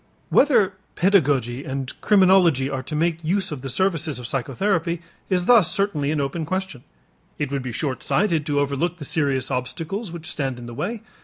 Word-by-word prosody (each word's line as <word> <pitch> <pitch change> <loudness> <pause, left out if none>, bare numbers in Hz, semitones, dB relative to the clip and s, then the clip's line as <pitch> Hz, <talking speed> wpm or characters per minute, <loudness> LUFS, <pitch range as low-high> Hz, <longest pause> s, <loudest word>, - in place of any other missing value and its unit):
Whether 230 -9 +4 0.2
pedagogy 140 - +2
and 135 -1 -4
criminology 185 - +4
are 135 -1 -2
to 150 +4 -6
make 165 +1 0
use 190 +3 0
of 145 -4 -5
the 135 - -5
services 165 -3 0
of 125 - -6
psychotherapy 170 - -1 0.3
is 180 -2 +1
thus 225 -7 +6
certainly 170 -8 0
an 155 0 0
open 140 +4 -2
question. 185 -6 -4 0.5
It 145 -2 -3
would 140 -1 -1
be 125 -1 -5
short 130 +2 -2
sighted 175 -6 +1
to 145 -1 +1
overlook 145 +5 -1
the 150 - -7
serious 140 -3 0
obstacles 165 - -3
which 170 -1 -8
stand 135 -5 -3
in 120 - -9
the 120 - -8
way. 210 - -4
155 Hz, 180 wpm, -23 LUFS, 135-185 Hz, 0.5 s, thus